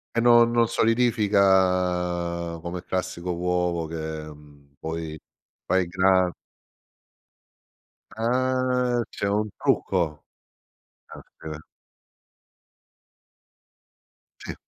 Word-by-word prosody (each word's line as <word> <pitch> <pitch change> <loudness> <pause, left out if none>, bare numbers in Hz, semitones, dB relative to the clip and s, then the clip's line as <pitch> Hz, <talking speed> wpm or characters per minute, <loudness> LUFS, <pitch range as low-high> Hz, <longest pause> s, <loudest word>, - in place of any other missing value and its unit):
E - - +2
non 120 0 +6
non 120 -1 +3
solidifica 90 -7 +1
come 85 +1 -6
classico 90 -1 -3
uovo, 90 -1 -1
che, 80 - -7 0.4
mhmm, 70 -1 -18
poi, 80 -1 -5 0.5
fai 95 -1 +1
gra 95 0 +3 1.8
Ah 125 +1 0
c'è 100 - -3
un 105 +2 0
trucco. 85 -6 0 0.9
Oka 80 -1 -10 2.8
Sì. - - -6
90 Hz, 75 wpm, -25 LUFS, 85-115 Hz, 2.8 s, non